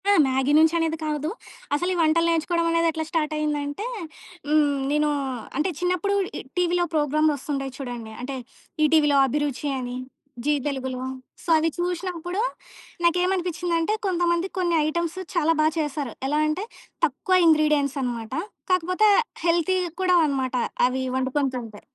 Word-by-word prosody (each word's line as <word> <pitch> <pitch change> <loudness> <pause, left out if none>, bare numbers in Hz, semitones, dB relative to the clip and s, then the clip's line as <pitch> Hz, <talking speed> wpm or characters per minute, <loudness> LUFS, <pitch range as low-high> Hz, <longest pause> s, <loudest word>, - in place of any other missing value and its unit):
ఆ! - - +7 0.2
మ్యాగీ 265 +2 +1
నుంచి 320 +1 +5
అనేది 325 -1 0
కాదు. 300 0 -1 0.5
అసలు 350 +5 0
ఈ - - -3
వంటలు 330 +1 +3
నేర్చుకోవడమానేది 335 0 +1
ఎట్లా 320 0 -3
స్టార్ట్ 320 -2 0
అయిందంటే 295 +4 -2 0.6
హ్మ్, 295 -2 +3
నేను 300 0 +2 0.5
అంటే 305 +6 +1
చిన్నప్పుడు 365 +3 0 0.2
ఈ - - -5 0.2
టీవీలో 355 0 +2
ప్రోగ్రాములు 305 0 +2
ఒస్తుంటాయి 275 -1 -4
చూడండి. 240 -4 -6
అంటే 265 +2 -4 0.5
ఈటీవీలో 300 -2 +4
అభిరుచి 290 +1 -1
అని, 245 0 -4 0.5
జీ 295 - +3
తెలుగులో. 260 -2 -3 0.4
సో, - - -8
అవి 320 +1 +2
చూశినప్పుడు 355 +1 -2 0.6
నాకేమనిపించిందంటే 355 0 +1
కొంతమంది 350 -1 +1
కొన్ని 350 -2 +1
ఐటెమ్స్ 340 +3 -2 0.2
చాలా 330 -1 +3
బా - - +4
చేశారు. 295 -5 -2
ఎలా 295 +2 +1
అంటే 305 +6 -1 0.4
తక్కువ 315 +6 0
ఇంగ్రీడియెంట్స్ 300 -3 +3
అనమాట. 235 -3 -4 0.4
కాకపోతే 365 +4 +3 0.4
హెల్తీ 345 +2 +2 0.2
కూడా 365 -1 +4
అనమాట 265 -3 -1 0.3
అవి 260 +1 -2 0.2
వండుకొని 265 +1 0
తింటే. 225 -4 -7
310 Hz, 135 wpm, -24 LUFS, 280-345 Hz, 0.6 s, ఆ